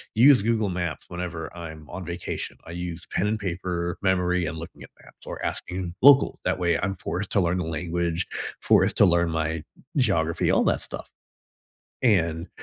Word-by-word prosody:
use 130 Hz, +2 st, +7 dB
Google 110 Hz, -2 st, +1 dB
Maps 85 Hz, -3 st, -3 dB
whenever 85 Hz, -2 st, -5 dB
I'm 80 Hz, -3 st, -8 dB
on 90 Hz, +1 st, -6 dB
vacation. 85 Hz, +1 st, -4 dB
I 80 Hz, -, -9 dB
use 85 Hz, -1 st, -5 dB
pen 105 Hz, -, +1 dB
and 110 Hz, +1 st, 0 dB
paper, 90 Hz, -2 st, -3 dB
memory, 90 Hz, -2 st, +2 dB
and 80 Hz, -, -4 dB
looking 80 Hz, -, -9 dB
at -, -, -12 dB
maps -, -, -18 dB
or -, -, -6 dB
asking 90 Hz, -1 st, -3 dB
locals. 140 Hz, +1 st, +6 dB
That -, -, 0 dB
way 85 Hz, -1 st, +2 dB
I'm 95 Hz, 0 st, -1 dB
forced 95 Hz, +3 st, -4 dB
to 100 Hz, -, +4 dB
learn 85 Hz, 0 st, +1 dB
the 90 Hz, -, -2 dB
language, 85 Hz, +1 st, -2 dB, 0.3 s
forced -, -, +4 dB
to -, -, +7 dB
learn 85 Hz, -2 st, +3 dB
my 80 Hz, -1 st, -1 dB, 0.3 s
geography, 85 Hz, -, +2 dB
all -, -, +4 dB
that -, -, +2 dB
stuff. -, -, -6 dB, 0.9 s
And 85 Hz, -7 st, +2 dB
90 Hz, 175 wpm, -25 LUFS, 85-95 Hz, 0.9 s, use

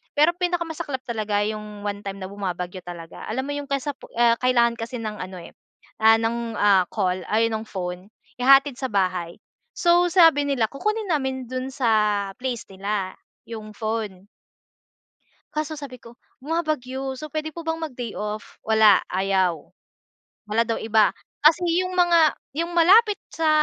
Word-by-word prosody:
Pero 305 Hz, +4 st, +4 dB
pinakamasaklap 340 Hz, -6 st, -2 dB
talaga 215 Hz, -3 st, -1 dB
'yong 210 Hz, -1 st, -5 dB
one 205 Hz, 0 st, -4 dB
time 195 Hz, 0 st, -6 dB
na 190 Hz, -, -5 dB
bumabagyo 185 Hz, -2 st, -4 dB
talaga. 170 Hz, -2 st, -9 dB
Alam 260 Hz, +4 st, -1 dB
mo 285 Hz, -, -3 dB
'yong 285 Hz, -1 st, -6 dB
kasapu 275 Hz, 0 st, -3 dB
ah, 235 Hz, 0 st, +4 dB
kailangan 240 Hz, -2 st, +3 dB
kasi 235 Hz, +2 st, -5 dB
ng 215 Hz, -2 st, -5 dB
ano, 185 Hz, -1 st, -8 dB
eh, 170 Hz, -, -11 dB, 0.5 s
ah, 225 Hz, 0 st, +7 dB
ng 225 Hz, +1 st, 0 dB, 0.2 s
ah, 200 Hz, -2 st, +5 dB
call, 185 Hz, -3 st, -1 dB
ay, 225 Hz, +1 st, +3 dB
nung 220 Hz, 0 st, -2 dB
phone, 180 Hz, 0 st, -5 dB, 0.3 s
ihahatid 275 Hz, +2 st, +5 dB
sa 260 Hz, -, -1 dB
bahay. 185 Hz, -4 st, -1 dB, 0.4 s
So 350 Hz, 0 st, +4 dB
sabi 325 Hz, -5 st, +6 dB
nila 245 Hz, -6 st, +1 dB
kukunin 425 Hz, +8 st, -2 dB
namin 265 Hz, -4 st, -1 dB
do'n 255 Hz, +2 st, -4 dB
sa 210 Hz, -6 st, +1 dB
place 250 Hz, -3 st, -3 dB
nila 195 Hz, 0 st, -3 dB, 0.3 s
'yong 220 Hz, -2 st, -8 dB
phone. 215 Hz, -4 st, -4 dB, 1.3 s
Kaso 310 Hz, 0 st, -3 dB
sabi 265 Hz, -4 st, -9 dB
ko, 235 Hz, 0 st, -15 dB, 0.2 s
"Bumabagyo, 270 Hz, -4 st, -2 dB
so 285 Hz, +4 st, -7 dB
pwede 310 Hz, +1 st, -4 dB
po 335 Hz, -, -7 dB
bang 325 Hz, 0 st, -2 dB
mag-day 250 Hz, -8 st, -6 dB
off?" 210 Hz, +1 st, -5 dB
Wala, 220 Hz, -3 st, +5 dB
ayaw. 185 Hz, -4 st, 0 dB, 0.8 s
Wala 225 Hz, +2 st, +2 dB
daw 230 Hz, -, -2 dB
iba. 220 Hz, -1 st, +3 dB, 0.3 s
Kasi 320 Hz, +3 st, +6 dB, 0.2 s
yung 365 Hz, -, -4 dB
mga 340 Hz, -4 st, +5 dB, 0.2 s
yung 335 Hz, +1 st, -2 dB
malapit 405 Hz, +5 st, +6 dB
sa 325 Hz, -1 st, 0 dB
235 Hz, 155 wpm, -24 LUFS, 205-300 Hz, 1.3 s, ah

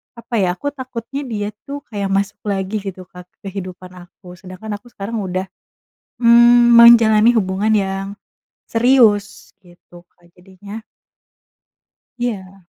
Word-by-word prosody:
apa 235 Hz, +1 st, -7 dB
ya, 180 Hz, -2 st, 0 dB
aku 285 Hz, +8 st, -4 dB
takutnya 260 Hz, 0 st, -7 dB
dia 210 Hz, -3 st, -4 dB, 0.2 s
tuh 285 Hz, +1 st, -6 dB
kayak 200 Hz, -2 st, -3 dB
masuk 200 Hz, +1 st, -1 dB
lagi 195 Hz, +1 st, -2 dB
gitu, 190 Hz, -2 st, -8 dB
Kak, 180 Hz, -1 st, -14 dB
ke 195 Hz, -2 st, -10 dB
kehidupan 185 Hz, -1 st, -8 dB, 0.2 s
aku, 180 Hz, 0 st, -15 dB
sedangkan 190 Hz, +3 st, -8 dB
aku 240 Hz, -, -21 dB
sekarang 220 Hz, +3 st, -6 dB
udah, 185 Hz, -2 st, -3 dB, 0.8 s
mmm, 240 Hz, 0 st, +6 dB
menjalani 230 Hz, -1 st, +7 dB
hubungan 200 Hz, +2 st, 0 dB
yang 195 Hz, -1 st, -3 dB, 0.6 s
serius 225 Hz, -4 st, +2 dB
gitu, 175 Hz, 0 st, -18 dB
Kak. 175 Hz, 0 st, -27 dB
Jadinya 195 Hz, +4 st, -12 dB, 1.4 s
Iya. 195 Hz, -6 st, -5 dB
205 Hz, 125 wpm, -18 LUFS, 190-235 Hz, 1.4 s, menjalani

